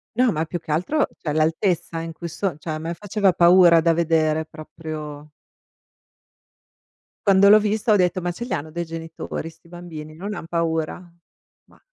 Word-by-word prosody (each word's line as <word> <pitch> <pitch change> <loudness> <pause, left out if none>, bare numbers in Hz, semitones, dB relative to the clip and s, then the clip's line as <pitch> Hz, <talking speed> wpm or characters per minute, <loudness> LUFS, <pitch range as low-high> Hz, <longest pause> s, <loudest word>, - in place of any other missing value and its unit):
No, 250 -1 +3
ma 155 +1 -1
più 175 +1 -5
che 155 - -7
altro, 180 - +1
cioè 150 - -4
l'altezza 165 +2 0
in 165 0 -6
cui 170 +2 -7
so 180 0 -3
cioè 165 - -8
a 155 - -2
me 165 +2 -4
faceva 205 0 +1
paura 175 -1 +6
da 165 0 +3
vedere 160 -1 +1
proprio. 155 -1 -8 2.0
Quando 200 -1 +6
l'ho 210 +1 +9
vista 215 +1 +1
ho - - +5
detto: 180 -2 +2
"Ma 175 0 -2
ce 235 - -6
li 245 - -8
hanno 150 +2 -2
dei 170 +2 -4
genitori 165 0 -6
'sti 165 +1 -21
bambini? 165 -3 -9
Non 195 +6 -6
han 185 - -7
paura?" 165 +1 -2 0.6
Ma - - -23
170 Hz, 175 wpm, -22 LUFS, 155-185 Hz, 2.0 s, l'ho